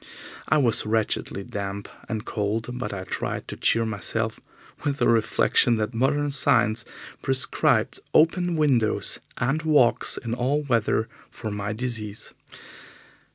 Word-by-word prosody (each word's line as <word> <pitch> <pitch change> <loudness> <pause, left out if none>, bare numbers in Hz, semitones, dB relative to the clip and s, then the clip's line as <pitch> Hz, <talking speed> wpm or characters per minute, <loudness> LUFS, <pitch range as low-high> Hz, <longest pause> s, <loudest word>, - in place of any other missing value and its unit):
I 155 - +4
was 120 -7 +3
wretchedly 110 -2 -1
damp 100 0 -5 0.2
and 110 -1 -3
cold, 110 +2 -2
but 125 - -3
I 95 -2 -5
tried - - -4
to - - -5
cheer 115 0 +2
myself 110 +1 -2 0.4
with 140 -1 -1
the - - +2
reflection 115 +1 +3
that 110 +2 -2
modern 145 +5 +1
science 115 -4 +2 0.4
prescribed 130 -1 +1
open 175 +2 +3
windows 135 -8 +2 0.2
and 145 +5 0
walks 130 -7 +3
in 115 -2 -4
all 130 +5 0
weather 115 -4 +1 0.2
for 110 - -6
my 105 0 -3
disease. 110 -3 -5
115 Hz, 130 wpm, -25 LUFS, 110-135 Hz, 0.4 s, I